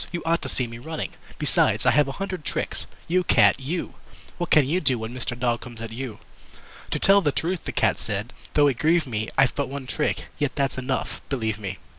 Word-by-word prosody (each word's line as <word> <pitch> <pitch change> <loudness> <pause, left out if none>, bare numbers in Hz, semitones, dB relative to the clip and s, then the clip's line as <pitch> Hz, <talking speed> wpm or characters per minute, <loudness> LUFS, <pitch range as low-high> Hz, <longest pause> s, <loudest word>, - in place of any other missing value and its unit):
"You 175 - -4
ought 165 +1 +2
to - - -1
see 125 - +2
me 115 0 -8
running. 160 +5 -4 0.3
Besides, - - +2
I - - +6
have 150 -1 +4
a 135 - -4
hundred 190 -3 -4
tricks. - - -2 0.2
You 180 +2 +2
Cat, - - +5
you! 155 +7 -3 0.5
What 175 - -2
can 150 -4 +5
you 175 +6 +1
do 130 -7 +3
when 110 +1 -5
Mr. 125 -1 -3
Dog 120 -1 0
comes 120 -2 -9
at 115 -1 -6
you?" 115 -2 -5 0.7
"To - - 0
tell 200 +1 +6
the 150 -5 +2
truth," 170 +5 -2
the - - -3
Cat - - +1
said, 105 +2 -3 0.2
"though 145 - +6
it 135 -4 +2
grieve 165 +2 +3
me 110 -4 -3
I've 135 -2 +4
but 140 - -2
one 140 -1 -5
trick. 150 +4 -1
Yet 145 -4 0
that's 135 -3 0
enough 130 +1 -3
believe 110 -6 -1
me!" 100 -2 -5
135 Hz, 225 wpm, -25 LUFS, 120-160 Hz, 0.7 s, I